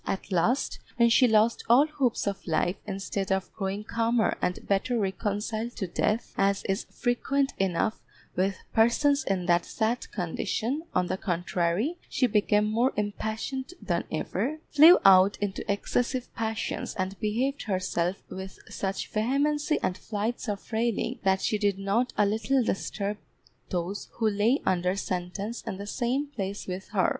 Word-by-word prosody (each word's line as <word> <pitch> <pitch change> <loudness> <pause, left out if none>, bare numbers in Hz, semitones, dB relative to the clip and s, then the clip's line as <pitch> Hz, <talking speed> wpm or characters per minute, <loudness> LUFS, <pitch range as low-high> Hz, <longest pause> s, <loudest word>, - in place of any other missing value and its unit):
At 195 - -3
last, 210 +10 +1 0.2
when 235 -1 +5
she 250 +2 +6
lost 220 +1 +3
all 255 +5 +7
hopes 275 -6 0
of 200 -2 -3
life, 175 +3 +1
instead 195 -1 -3
of 190 0 -1
growing 195 +1 -3
calmer 230 +1 +1
and 180 - -2
better 220 +5 +1
reconciled 215 +3 -2
to 195 - -2
death, 210 +5 -1
as 195 0 +2
is 195 +2 -1
frequent 270 +3 0
enough 195 +3 0 0.3
with 190 +1 +1 0.2
persons 280 +6 +3
in 190 -2 -1
that 175 -1 +3
sad 230 +2 -2
condition, 215 - -2
on 180 - +3
the 185 +1 -2
contrary, 180 - -1
she 260 - +2
became 210 -2 +3
more 230 +5 +1
impatient 220 - -3
than - - -1
ever, 310 +3 -2
flew 315 +4 +9
out 195 +1 +7
into 200 -1 -2
excessive 245 +5 -1
passions 220 -1 -3
and 190 -1 -3
behaved 245 +6 0
herself 185 -2 -1
with 190 0 -8
such 195 0 -3
vehemency 290 +7 +1
and 180 - -1
flights 225 +3 -3
of 205 +1 -5
railing, 230 0 0
that 190 0 +2
she 215 - 0
did 200 -2 +1
not 210 +6 0
a 210 - +5
little 220 +6 +1
disturb 205 -1 -2 0.5
those 180 +3 -3
who 225 - 0
lay 215 +6 +2
under 180 0 +1
sentence 195 +4 -3
in 215 -4 -5
the 200 - -6
same 250 +6 -1
place 205 -8 -5
with 185 +1 -5
her. 195 -3 +2
210 Hz, 155 wpm, -28 LUFS, 195-240 Hz, 0.5 s, flew